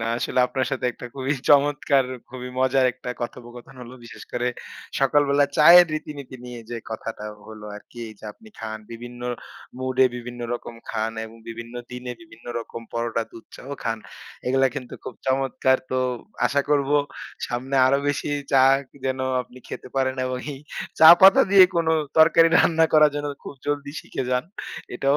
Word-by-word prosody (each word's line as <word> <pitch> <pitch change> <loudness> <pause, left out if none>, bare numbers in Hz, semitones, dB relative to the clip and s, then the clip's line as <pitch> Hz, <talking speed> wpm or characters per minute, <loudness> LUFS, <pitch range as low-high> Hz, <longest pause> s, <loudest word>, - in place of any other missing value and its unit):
না, 115 - -2
আসলে 125 +1 0
আপনার 130 0 -2
সাথে - - -3
একটা 125 - -9
খুবই 135 +1 -1 0.2
চমৎকার 140 -1 +4 0.3
খুবই 125 0 -7
মজার 130 0 +3
একটা 125 - -7
কথোপকথন 120 +1 -8
হলো। 125 +1 -10
বিশেষ - - -11
করে 125 0 0 0.5
সকালবেলা 145 +1 +3
চায়ের 175 +3 +9
রীতিনীতি 145 -4 -7
নিয়ে 125 -1 -8
যে 120 - -3
কথাটা 110 -1 -6 0.2
হলো 110 -1 -10
আরকি, 120 +3 -15
এই 110 - -11
যে - - -13
আপনি 220 - -18
খান। 110 -1 -5
বিভিন্ন 120 +1 -9 0.6
মুডে, 130 0 +2
বিভিন্ন 120 0 -8
রকম 120 0 -8 0.2
খান 110 0 -2
এবং 110 +1 -12
বিভিন্ন 115 +1 -8 0.2
দিনে 125 0 -6
বিভিন্ন 120 -9 -17
রকম 115 0 -8
পরোটা, 115 0 -1
দুধ 115 - -12
চাও 140 - -9
খান। 115 -1 -1 0.5
এগুলা 135 +1 +3
কিন্তু 130 -4 -6
খুব 125 - -7
চমৎকার। 130 0 +2
তো 130 - 0 0.5
আশা 140 0 +1
করব 140 -1 +2 0.6
সামনে 130 +3 -3
আরো 140 +1 +3
বেশি 145 - -2 0.2
চা 135 -1 +6 0.4
যেন 130 0 -1 0.2
আপনি 125 +1 -16
খেতে - - -8
পারেন 130 0 +1
এবং 130 0 -3 0.2
এই - - -11 0.4
চা 160 - +10
পাতা 190 +1 +8
দিয়ে 195 -2 +9
কোন 170 - +1 0.3
তরকারি 165 +1 +7
রান্না 165 -1 +4
করার 155 -1 +6
জন্য 145 0 -3 0.2
খুব - - -8
জলদি 145 -1 -2
শিখে - - -5
যান। 125 0 +1 0.5
এটাও 140 +3 +2
130 Hz, 165 wpm, -23 LUFS, 120-140 Hz, 0.6 s, চা